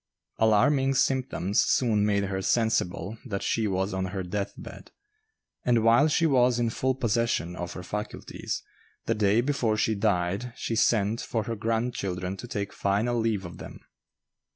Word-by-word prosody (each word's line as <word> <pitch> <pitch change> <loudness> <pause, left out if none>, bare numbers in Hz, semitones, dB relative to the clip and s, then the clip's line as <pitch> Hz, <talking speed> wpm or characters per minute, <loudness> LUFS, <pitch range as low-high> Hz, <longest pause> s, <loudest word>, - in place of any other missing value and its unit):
Alarming 135 +6 +3
symptoms 130 -8 +1
soon 110 -5 +2
made 100 -1 +2
her 95 -1 -2
sensible 110 -2 0
that 100 -6 -4
she 110 -2 0
was 95 +1 -1
on 95 0 -1
her 95 0 -4
death 100 +3 -3
bed; - - -10 0.7
and 120 -2 +2
while 115 +6 +5
she 160 +2 +2
was 125 -5 +3
in 120 -1 0
full 130 +2 0
possession 115 - 0
of 90 -1 -5
her 90 - -7
faculties, 105 +3 -5 0.4
the 115 - +1
day 105 +1 +3
before 125 -5 0
she 110 - +1
died 100 +2 0
she 115 - -3
sent 110 0 +2
for 110 -2 -2
her 115 0 -3
grandchildren 105 -5 -2
to 120 - -8
take 100 -3 -4
final 110 +5 0
leave 110 -4 0
of 85 - -9
them. - - -9
110 Hz, 160 wpm, -27 LUFS, 100-120 Hz, 0.7 s, while